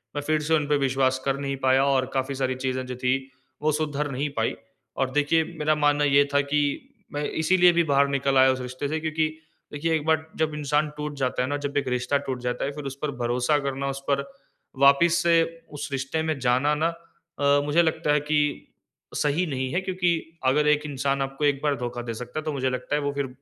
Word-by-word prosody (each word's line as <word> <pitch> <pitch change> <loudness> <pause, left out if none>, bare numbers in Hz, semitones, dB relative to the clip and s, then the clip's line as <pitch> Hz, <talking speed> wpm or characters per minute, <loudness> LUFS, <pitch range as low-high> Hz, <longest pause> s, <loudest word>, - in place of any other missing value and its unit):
मैं 145 - -1
फिर 155 0 +1
से 155 +2 0
उनपे 150 -1 +1
विश्वास 130 -1 +1
कर 135 0 +1
नहीं 140 -1 -2
पाया 130 +1 +4
और 135 -2 +2
काफ़ी 135 +1 -1
सारी 130 -1 -1
चीज़ें 130 0 -2
जो 125 - -5
थी 125 +1 +1 0.5
वो 155 - +3
सुधर 150 -1 -1
नहीं 140 +3 -2
पाई 110 - 0 0.4
और 130 0 0
देखिए 150 +3 +2 0.2
मेरा 155 0 +2
मानना 145 -1 +2
ये 140 0 +5
था 140 - +4
कि 150 - +3 0.5
मैं 145 0 -2
इसीलिए 180 +2 +4
भी 170 - +3
बाहर 140 -1 +3
निकल 135 -1 +1
आया 130 0 +6
उस 130 0 -3
रिश्ते 130 +3 -4
से 155 +2 -2
क्योंकि 155 0 0 0.5
देखिए 160 +3 0
एक 155 -1 -2
बार 160 0 +2
जब 155 -1 0
इंसान 150 +1 0
टूट 150 0 -4
जाता 130 -2 0
है - - -1
ना, 145 - -1
जब 145 0 -3
एक 140 -2 0
रिश्ता 125 +3 0
टूट 130 -2 -3
जाता 125 0 -2
है 140 - -2
फिर 145 0 -8
उस 135 -1 -4
पर 150 -2 -1
भरोसा 125 +5 +1
करना 140 -1 -3
उस 135 0 -4
पर 140 0 +2 0.6
वापिस 140 +5 +5
से 165 -1 +5 0.3
उस 145 - -5
रिश्ते 135 +4 -2
में 155 -2 -1
जाना 130 +4 +2
ना 160 +2 +1 0.5
अ, 145 0 +4
मुझे 150 +4 +3
लगता 160 -2 +1
है 150 - +3
कि 150 +1 +1 0.8
सही 150 +5 +1
नहीं 130 -3 -2
है 180 - +1
क्योंकि 180 -3 0 0.3
अगर 150 +3 +3
एक 150 0 +3
इंसान 140 -1 -1
आपको 135 +2 -2
एक 140 -1 +1
बार 145 -1 +2
धोखा 120 -1 -4
दे 120 -1 -5
सकता 125 +5 -6
है, 155 - -6
तो 155 - -2
मुझे 130 -1 0
लगता 130 +3 -2
है 150 - 0
वो 145 0 -1
फिर 140 -1 -2
140 Hz, 230 wpm, -25 LUFS, 130-150 Hz, 0.8 s, आया